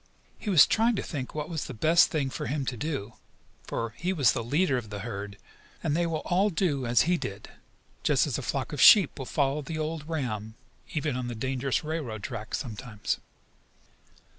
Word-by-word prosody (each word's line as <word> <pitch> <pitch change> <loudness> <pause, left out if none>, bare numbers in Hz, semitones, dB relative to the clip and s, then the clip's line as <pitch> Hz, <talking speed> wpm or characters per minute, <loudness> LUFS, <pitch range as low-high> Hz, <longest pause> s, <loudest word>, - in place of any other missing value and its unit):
He - - -4
was 175 -8 +8
trying 230 +1 +2
to - - -2
think 135 -5 -5
what 150 -1 -3
was 160 -3 -3
the - - -7
best 160 +9 +5
thing 140 -5 -1
for - - -4
him 140 +2 -2
to 125 - -2
do, 120 -4 -4 0.5
for 115 -1 -3
he 180 +2 -1
was 140 - +4
the 115 - -2
leader 145 +5 +2
of 120 -4 -3
the 105 -1 -6
herd, 100 -2 -6 0.5
and 150 -2 +1
they 170 +1 +1
would 160 -2 -2
all 190 +4 +3
do 155 -9 0
as 120 0 +4
he 175 +1 +2
did, - - -6 0.5
just - - +3
as - - -2
a - - -4
flock - - -3
of - - -2
sheep 195 -11 +8
will 130 - -5
follow 140 +1 0
the 155 +2 -5
old 155 0 -4
ram, 110 -8 -3 0.4
even 150 -3 0
on 125 -1 -3
the 120 - -4
dangerous 130 +4 -1
railroad 145 -10 -4
track 110 -3 -4
sometimes. 110 -3 -4
140 Hz, 200 wpm, -28 LUFS, 120-160 Hz, 0.5 s, was